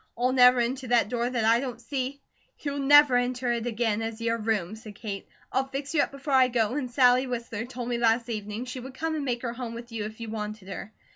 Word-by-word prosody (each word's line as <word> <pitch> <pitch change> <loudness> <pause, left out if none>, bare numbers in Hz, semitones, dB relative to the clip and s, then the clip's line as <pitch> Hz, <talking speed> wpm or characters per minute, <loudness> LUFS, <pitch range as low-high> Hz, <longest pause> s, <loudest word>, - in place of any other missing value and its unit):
I'll 250 +2 +2
never 250 -1 +7
enter 255 +2 -1
that 235 -3 +3
door 240 0 0
that 240 -3 0
I 230 +1 +5
don't 250 -3 -5
see 265 +2 -4 0.2
" - - -39
"You'll 285 -1 -3
never 290 -1 +7
enter 245 0 0
it 235 0 -1
again 225 -2 0
as 225 0 -4
your 230 0 0
room," 215 -3 -1
said 220 -2 -11
Kate. 200 -2 -6 0.2
"I'll 265 +1 0
fix 275 +2 -5
you 300 - +4
up - - 0
before 275 +1 -5
I 260 -1 +6
go; 235 -2 +1
and 270 -3 -2
Sally 250 +1 +4
Whistler 235 -2 -4
told 245 -1 -6
me 240 -1 -1
last 230 0 +2
evening 215 +1 -4
she 255 +1 -6
would 260 +1 -9
come 320 +3 -2
and 305 -2 -2
make 245 -2 -2
her 235 -1 -2
home 240 -2 -6
with 235 +1 -9
you 220 -2 -3
if 215 +1 -8
you 225 -2 -6
wanted 210 -2 -5
her. 195 +1 -7
240 Hz, 255 wpm, -27 LUFS, 225-260 Hz, 0.2 s, never